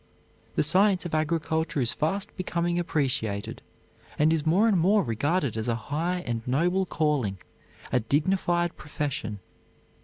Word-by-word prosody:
The - - +3
science 185 +4 +3
of 175 - -5
agriculture 160 0 0
is 120 -2 +2
fast 195 +7 -2
becoming 175 -2 -1
appreciated 130 -11 -1 0.6
and 155 +2 +4
is 160 -1 -1
more 190 +8 +4
and 215 - +3
more 200 +4 +4
regarded 140 - 0
as 110 0 -3
a 115 - +1
high 165 +10 -2
and 115 -1 -2
noble 175 +8 +1
calling, 145 -13 0 0.5
a 125 - +3
dignified 175 - +1
profession. 130 -9 -4
155 Hz, 135 wpm, -27 LUFS, 130-175 Hz, 0.6 s, and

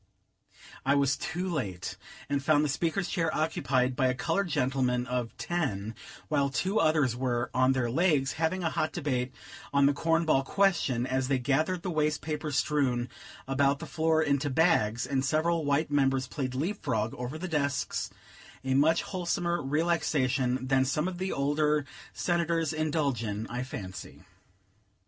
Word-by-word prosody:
I 140 +1 +3
was 140 0 +3
too 180 +3 -3
late, 105 - -3 0.3
and 140 -1 -1
found 150 0 +3
the - - -1
Speaker's 170 +6 0
chair 165 -1 0
occupied 130 -5 +1
by 130 -1 +2
a 125 - +1
colored 175 +8 0
gentleman 130 -4 0
of 125 -2 -3
ten; 115 - -2 0.3
while 140 -2 +1
two 190 +9 0
others 155 -6 +3
were 125 -1 -1
"on 130 +1 +4
their 130 -2 0
legs," 140 0 +2
having 165 +3 -1
a 165 - 0
hot 155 0 -1
debate 130 -6 -1 0.4
on 140 0 +4
the 140 - +4
cornball 165 -2 +2
question, 145 -8 +1
as 130 0 0
they 135 -1 +2
gathered 155 +8 0
the 185 - -2
waste 150 -1 +1
paper 150 -1 -3
strewn 135 -3 +1 0.4
about 140 +1 +2
the - - -7
floor 160 0 +1
into 145 -1 +1
bags; 130 -7 +2
and 135 -1 0
several 160 +3 +1
white 145 +2 +1
members 135 -2 +2
played 130 -1 -4
leap 175 +10 -2
frog 110 -5 -1
over 125 +5 -5
the 185 +3 -4
desks, 145 -4 -1 0.5
a 130 0 0
much 155 +5 +4
wholesomer 175 -2 -1
relaxation 135 -4 +1
than 130 0 +3
some 150 +5 0
of 180 -1 -5
the 190 +1 -2
older 150 +1 +1 0.3
Senators 165 -2 0
indulge 150 -6 0
in, 105 0 -3
I 125 +1 -2
fancy. 95 -10 -7
140 Hz, 160 wpm, -29 LUFS, 130-160 Hz, 0.5 s, on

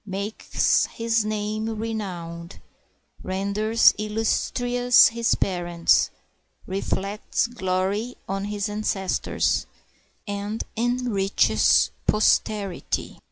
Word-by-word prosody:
Makes 200 +2 0
his 230 -1 0
name 215 +1 -2
renowned, 185 -6 -5 0.6
renders 200 +4 +2
illustrious 245 +3 +3
his 230 0 +1
parents, 175 -3 +1 0.6
Reflects 195 +3 -2
glory 205 +1 -2
on 195 +1 -3
his 205 0 -2
ancestors, 210 -2 -1 0.6
and 205 +2 -3
enriches 235 -4 +2 0.2
posterity. 210 -2 0
210 Hz, 70 wpm, -24 LUFS, 195-225 Hz, 0.6 s, illustrious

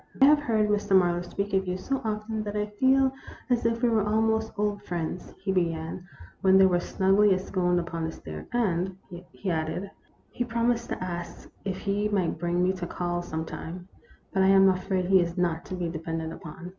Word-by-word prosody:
I 270 - +8
have 295 +1 +6
heard 220 -7 +1
Mr. 205 -1 +2
Marlow 175 -1 +2
speak 200 +3 -4
of 190 -1 +1
you 180 0 -1
so 270 +8 -2
often 215 0 -2
that 210 -1 -5
I 210 0 0
feel 260 +5 +3 0.4
as 235 -2 +3
if 230 +1 -1
we 240 - +5
were 220 -2 +2
almost 220 +1 +1
old 205 -1 0
friends," 175 -2 -5
he 190 0 -2
began, 170 -1 -2 0.3
when 190 0 +6
they 190 - +7
were 180 -2 +3
snugly 195 +3 +3
ensconced 185 -1 0
upon 165 -1 -3
the 160 - -3
stairs; 80 - -9
"and," 190 -6 0 0.3
he 190 - -3
added, 165 +4 -2 0.4
"he 245 - -2
promised 235 0 0
to - - -3
ask 175 -1 -6
if 190 -2 -2
he 205 +1 -1
might 185 -6 0
bring 175 +1 0
me 185 +1 +2
to 180 -2 -5
call 175 0 -2
some 160 -2 -4
time; 175 +3 -7 0.4
but 190 - +2
I 190 - +5
am 195 0 +7
afraid 185 0 0
he 190 0 +5
is 170 +1 -3
not 170 -2 0
to 185 - -5
be 175 -1 -2
depended 165 0 -4
upon. 170 +2 -9
190 Hz, 205 wpm, -27 LUFS, 175-210 Hz, 0.4 s, I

